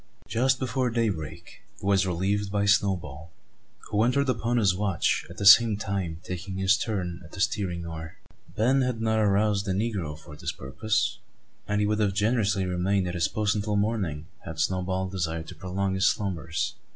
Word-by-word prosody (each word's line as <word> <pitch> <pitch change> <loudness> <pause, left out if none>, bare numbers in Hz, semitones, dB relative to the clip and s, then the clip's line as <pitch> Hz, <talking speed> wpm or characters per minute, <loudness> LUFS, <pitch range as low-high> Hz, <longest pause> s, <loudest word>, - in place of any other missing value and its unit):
Just 130 +3 +2
before 130 0 -1
daybreak, 85 -8 -3 0.2
he - - -9
was 95 -1 +3
relieved 95 +3 -1
by 100 0 +1
Snowball; 90 -6 +1 0.6
who 105 - +2
entered 140 +3 +2
upon 120 0 0
his 100 -5 +4
watch, 95 -6 0
at 85 - -11
the 100 - -3
same 110 +1 +8
time 95 -6 -3
taking 90 +1 -5
his 95 +1 +4
turn 90 -6 -3
at 80 - -15
the - - -8
steering 100 -5 -1
oar. 80 0 -7 0.4
Ben 130 +5 +3
had 125 -3 -1
not 110 0 +1
aroused 105 -1 +2
the 95 - +1
negro 95 -7 -2
for 75 -1 -12
this 75 - -4
purpose; 110 - -1 0.5
and 105 0 +1
he - - +2
would 105 +1 0
have 100 -3 +1
generously 105 -3 +1
remained 90 +1 0
at 90 - -3
his 85 -2 +1
post 105 -1 0
until 105 0 -1
morning, 100 -8 -1 0.2
had 80 0 -7
Snowball 95 0 0
desired 80 -4 -3
to - - -7
prolong 95 +1 -2
his 95 +2 +3
slumbers. 85 -5 -2
100 Hz, 180 wpm, -27 LUFS, 90-110 Hz, 0.6 s, same